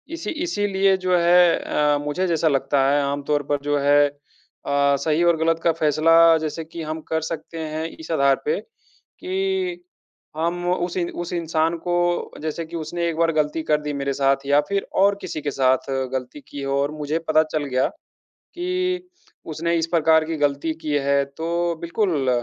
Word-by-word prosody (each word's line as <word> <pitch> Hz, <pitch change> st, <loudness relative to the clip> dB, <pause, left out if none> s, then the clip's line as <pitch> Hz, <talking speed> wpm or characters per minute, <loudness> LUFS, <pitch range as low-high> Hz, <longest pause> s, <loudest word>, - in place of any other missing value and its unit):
इसी 335 Hz, -, -5 dB, 0.2 s
इसीलिए 195 Hz, -, +1 dB
जो 185 Hz, -1 st, +1 dB
है 175 Hz, 0 st, +5 dB
अ, 150 Hz, -1 st, +1 dB
मुझे 165 Hz, +6 st, -1 dB
जैसा 165 Hz, -1 st, +1 dB
लगता 135 Hz, -1 st, +2 dB
है, 145 Hz, 0 st, +3 dB
आम 140 Hz, 0 st, -2 dB
तौर 145 Hz, 0 st, 0 dB
पर 145 Hz, -, +2 dB
जो 145 Hz, 0 st, +1 dB
है 145 Hz, +1 st, +4 dB, 0.6 s
अ, 140 Hz, 0 st, +2 dB
सही 155 Hz, +3 st, +1 dB
और 170 Hz, -1 st, +3 dB
गलत 165 Hz, +1 st, +1 dB
का 170 Hz, -, +4 dB
फ़ैसला, 165 Hz, +1 st, +4 dB
जैसे 160 Hz, +1 st, -4 dB
कि 165 Hz, +1 st, -8 dB
हम 155 Hz, +1 st, -5 dB
कर 160 Hz, 0 st, +1 dB
सकते 160 Hz, +1 st, -6 dB
हैं, 155 Hz, 0 st, -4 dB
इस 160 Hz, -, -10 dB
आधार 140 Hz, -3 st, +3 dB
पे, 465 Hz, +2 st, 0 dB, 0.6 s
कि 370 Hz, -1 st, -2 dB, 0.5 s
हम 175 Hz, +2 st, -1 dB
उस 175 Hz, 0 st, -2 dB
इ 175 Hz, -, +1 dB, 0.2 s
उस 175 Hz, -, -8 dB
इंसान 165 Hz, 0 st, 0 dB
को 175 Hz, 0 st, 0 dB, 0.5 s
जैसे 160 Hz, +1 st, -3 dB
कि 170 Hz, -, -9 dB
उसने 170 Hz, +2 st, -3 dB
एक 160 Hz, -, -3 dB
बार 165 Hz, 0 st, +3 dB
गलती 155 Hz, +1 st, 0 dB
कर 150 Hz, -1 st, +1 dB
दी 150 Hz, -1 st, -4 dB
मेरे 140 Hz, 0 st, -2 dB
साथ 135 Hz, 0 st, +1 dB
या 145 Hz, +1 st, +4 dB
फिर 200 Hz, 0 st, -1 dB, 0.2 s
और 200 Hz, 0 st, +4 dB
किसी 155 Hz, -, -5 dB
के 145 Hz, -1 st, -2 dB
साथ 130 Hz, 0 st, +1 dB, 0.2 s
गलती 130 Hz, +2 st, -5 dB
की 145 Hz, -, -7 dB
हो 135 Hz, 0 st, 0 dB
और 145 Hz, -, -1 dB
मुझे 150 Hz, +1 st, -2 dB
पता 155 Hz, 0 st, +4 dB
चल 155 Hz, -2 st, -3 dB
गया, 130 Hz, -1 st, +1 dB, 0.5 s
कि 365 Hz, 0 st, -3 dB, 0.4 s
उसने 170 Hz, +2 st, -1 dB
इस 165 Hz, 0 st, 0 dB
प्रकार 160 Hz, -1 st, +3 dB
की 160 Hz, 0 st, -3 dB
गलती 145 Hz, +2 st, 0 dB
की 150 Hz, -2 st, -2 dB
है, 140 Hz, 0 st, +3 dB
तो 170 Hz, +4 st, -2 dB
बिल्कुल, 170 Hz, -, 0 dB
160 Hz, 185 wpm, -22 LUFS, 145-170 Hz, 0.6 s, है